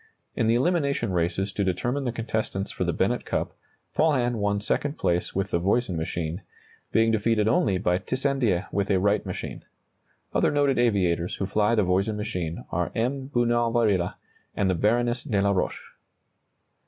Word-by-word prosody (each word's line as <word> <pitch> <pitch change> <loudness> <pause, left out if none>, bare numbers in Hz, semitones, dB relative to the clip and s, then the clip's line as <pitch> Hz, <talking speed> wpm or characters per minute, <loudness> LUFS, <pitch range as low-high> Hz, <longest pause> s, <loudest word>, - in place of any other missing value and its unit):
In 115 - +1
the 115 - +4
elimination 140 - +1
races 90 +3 0
to 100 - 0
determine 120 +9 -1
the 120 - 0
contestants 110 -4 -3
for - - -3
the - - 0
Bennett - - 0
Cup, - - -2 0.4
Paulhan 130 -7 +2
won 100 -1 0
second 145 +7 -1
place 90 -2 0
with 95 +1 -1
the 85 - +2
Voisin 100 +2 +1
machine, 80 +2 -3 0.5
being 115 0 +3
defeated 110 0 +2
only 105 -4 +2
by 90 -1 +1
Tissandier 130 -5 0
with 100 0 -1
a 95 - +3
Wright 100 +3 +2
machine. 90 - -6 0.7
Other - - +3
noted 145 -3 +2
aviators 90 -7 +1
who 95 - -2
fly 105 +3 +2
the 105 - +3
Voisin 95 +4 +1
machine 90 -6 -4
are 90 0 -1
M. 130 +4 -1
Bunau 120 -2 +2
Varilla 105 -7 +1 0.4
and 95 -2 +1
the - - +2
Baroness 120 +6 +1
de 115 -9 -1
la 100 0 +3
Roche. 95 -2 -2
105 Hz, 165 wpm, -26 LUFS, 95-120 Hz, 0.7 s, the